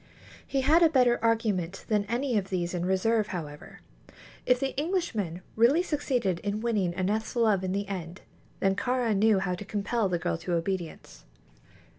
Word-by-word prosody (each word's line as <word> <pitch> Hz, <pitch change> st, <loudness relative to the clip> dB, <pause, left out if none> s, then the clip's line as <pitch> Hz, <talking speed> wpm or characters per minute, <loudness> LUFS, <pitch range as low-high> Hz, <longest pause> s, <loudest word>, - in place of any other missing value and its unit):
He 275 Hz, -, 0 dB
had 315 Hz, +6 st, +4 dB
a 330 Hz, -, +6 dB
better 250 Hz, -5 st, +3 dB
argument 210 Hz, -6 st, 0 dB
than 210 Hz, -2 st, +1 dB
any 240 Hz, +4 st, -1 dB
of 195 Hz, -2 st, 0 dB
these 175 Hz, -2 st, -2 dB
in 175 Hz, -1 st, -2 dB
reserve, 210 Hz, +3 st, +1 dB
however. 150 Hz, -6 st, -7 dB, 0.7 s
If 250 Hz, 0 st, +4 dB
the 270 Hz, 0 st, -2 dB
Englishman 260 Hz, -, -2 dB
really 255 Hz, +10 st, +4 dB
succeeded 255 Hz, -, -1 dB
in 205 Hz, +2 st, -3 dB
winning 205 Hz, -7 st, 0 dB
Aneth's 205 Hz, +6 st, -1 dB
love 215 Hz, -5 st, +2 dB
in 185 Hz, -, -2 dB
the 200 Hz, +1 st, -2 dB
end, 180 Hz, -2 st, -6 dB, 0.4 s
then 195 Hz, 0 st, +2 dB
Kāra 245 Hz, 0 st, 0 dB
knew 215 Hz, +1 st, +4 dB
how 190 Hz, -1 st, -1 dB
to 180 Hz, -, -5 dB
compel 205 Hz, +1 st, -1 dB
the 175 Hz, -, 0 dB
girl 85 Hz, -, -2 dB
to 175 Hz, -, -3 dB
obedience. 170 Hz, -1 st, -4 dB
205 Hz, 170 wpm, -28 LUFS, 185-240 Hz, 0.7 s, a